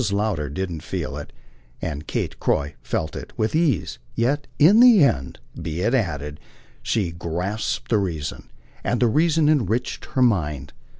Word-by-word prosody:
Lowder 100 Hz, -8 st, 0 dB
didn't 85 Hz, +1 st, -4 dB
feel -, -, -4 dB
it, -, -, -7 dB, 0.5 s
and 75 Hz, -1 st, -5 dB
Kate -, -, -3 dB
Croy 70 Hz, +1 st, 0 dB
felt 80 Hz, +4 st, -3 dB
it -, -, -7 dB
with 110 Hz, -, 0 dB
ease; 145 Hz, -, +1 dB, 0.2 s
yet 140 Hz, +5 st, 0 dB
in 185 Hz, +9 st, +7 dB
the 240 Hz, -8 st, +8 dB
end, 70 Hz, -, +1 dB, 0.2 s
be 80 Hz, +2 st, -3 dB
it 115 Hz, +6 st, +1 dB
added, 75 Hz, -, -1 dB, 0.4 s
she 100 Hz, -7 st, 0 dB
grasped 90 Hz, +7 st, -3 dB
the 110 Hz, -, +4 dB
reason, 80 Hz, -6 st, -4 dB, 0.3 s
and 120 Hz, -, 0 dB
the 125 Hz, -, +4 dB
reason 155 Hz, +4 st, +3 dB
enriched 125 Hz, -5 st, 0 dB
her 130 Hz, -, +1 dB
mind. 75 Hz, -, 0 dB
100 Hz, 155 wpm, -23 LUFS, 80-130 Hz, 0.5 s, the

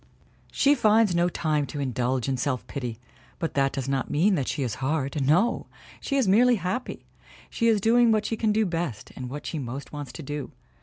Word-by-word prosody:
She 280 Hz, +1 st, +4 dB
finds 220 Hz, -6 st, +4 dB
no 175 Hz, +1 st, +2 dB
time 155 Hz, -4 st, -1 dB
to 145 Hz, -, -6 dB
indulge 130 Hz, -1 st, -1 dB
in 135 Hz, -, 0 dB
self 130 Hz, -1 st, -2 dB
pity, 125 Hz, -5 st, -5 dB, 0.4 s
but 165 Hz, -, -3 dB
that 135 Hz, -1 st, +2 dB
does 135 Hz, -2 st, -4 dB
not 135 Hz, -1 st, -1 dB
mean 185 Hz, +8 st, +3 dB
that 140 Hz, -8 st, 0 dB
she 140 Hz, -, -1 dB
is 125 Hz, 0 st, -4 dB
hard. 140 Hz, 0 st, -1 dB
No! 180 Hz, -, +2 dB, 0.3 s
She 275 Hz, -, -2 dB
is 260 Hz, -6 st, +2 dB
merely 240 Hz, +6 st, +5 dB
happy! 210 Hz, +6 st, -4 dB, 0.5 s
She 230 Hz, -, +1 dB
is 220 Hz, -2 st, +4 dB
doing 230 Hz, +3 st, +4 dB
what 215 Hz, -1 st, +2 dB
she 225 Hz, -, -1 dB
can 220 Hz, -1 st, +1 dB
do 215 Hz, +1 st, +2 dB
best 165 Hz, -, -3 dB
and 125 Hz, -1 st, -6 dB
what 145 Hz, +3 st, -7 dB
she 160 Hz, -, -3 dB
most 135 Hz, +3 st, -6 dB
wants 145 Hz, -3 st, -6 dB
to 160 Hz, -, -8 dB
do. 145 Hz, 0 st, -5 dB
155 Hz, 210 wpm, -26 LUFS, 135-215 Hz, 0.5 s, merely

